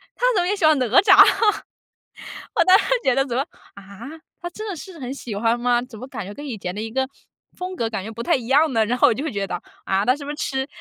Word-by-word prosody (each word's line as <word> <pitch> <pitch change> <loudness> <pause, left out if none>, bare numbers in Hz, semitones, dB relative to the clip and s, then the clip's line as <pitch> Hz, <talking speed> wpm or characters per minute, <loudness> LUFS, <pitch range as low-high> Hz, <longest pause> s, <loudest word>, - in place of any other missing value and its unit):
他 - - -1
怎 375 - +3
么 - - -1
也 405 - +1
喜 390 - -6
欢 310 -1 +5
哪 255 - +1 0.2
吒？ 385 -1 +6 1.4
我 340 - +3
当 370 +1 +7
时 - - -1 0.2
觉 260 - +3
得 270 +1 +2
怎 250 -4 -5
么， 265 - +2 0.3
啊？ 200 +5 -11 0.3
他 345 - -5
真 430 +5 -8
的 395 - -3
是 350 +1 -10
很 255 -2 -5
喜 235 -6 -7
欢 230 +3 +1
吗？ 240 0 +2
怎 250 -2 -11
么 255 - -8
感 210 - -6
觉 200 - -8
跟 290 - -9
以 250 -5 -5
前 180 -2 -5
的 210 - -5
一 225 - -5
个 265 +3 -1 0.5
风 365 0 -6
格 230 -8 -1
感 215 -4 -4
觉 215 - -7
不 230 +1 -6
太 - - +2
一 245 -3 -2
样 295 +4 +4
呢？ 225 -2 +2
然 245 +3 -1
后 - - +6
我 - - +2
就 265 - -5
会 315 - -3
觉 200 -1 -2
得， - - -5 0.3
啊？ 195 +1 0
他 255 +4 +2
是 290 - -9
不 285 - -6
是 295 - -5
痴 265 -3 -2
255 Hz, 310 characters per minute, -22 LUFS, 225-310 Hz, 1.4 s, 当